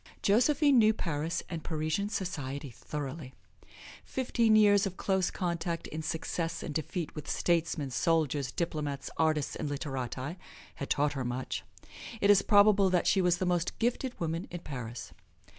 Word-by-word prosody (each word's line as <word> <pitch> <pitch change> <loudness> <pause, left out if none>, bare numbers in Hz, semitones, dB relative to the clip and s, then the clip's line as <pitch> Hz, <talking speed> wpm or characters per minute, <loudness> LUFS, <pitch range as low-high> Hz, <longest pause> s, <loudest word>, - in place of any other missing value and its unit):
Josephine 275 +6 +4
knew 215 -1 +5
Paris 165 -1 -2
and 165 -3 -5
Parisian 160 +6 -1
society 145 - -4
thoroughly. 140 +2 -6 0.7
Fifteen 235 -4 +2
years 205 -2 +5
of 185 - -7
close 190 -2 +1
contact 170 -1 -2
in 155 - -5
success 165 +1 -3
and 150 - -4
defeat 160 +2 -3
with 150 -2 -7
statesmen, 165 -5 0
soldiers, 145 -2 +1
diplomats, 150 -5 -3
artists 155 -3 +1
and 150 - -3
literati 135 +2 -4 0.3
had 140 - -6
taught 145 +1 +2
her 135 -2 -3
much. 125 +1 -3 0.6
It 200 0 +5
is 200 -1 +6
probable 205 -2 +5
that 180 -1 +2
she 195 - +4
was 180 -1 +3
the 185 - -1
most 175 -1 0
gifted 245 +2 -1
woman 165 +1 -2
in 175 -1 -6
Paris. 125 -6 -7
165 Hz, 150 wpm, -30 LUFS, 145-195 Hz, 0.7 s, is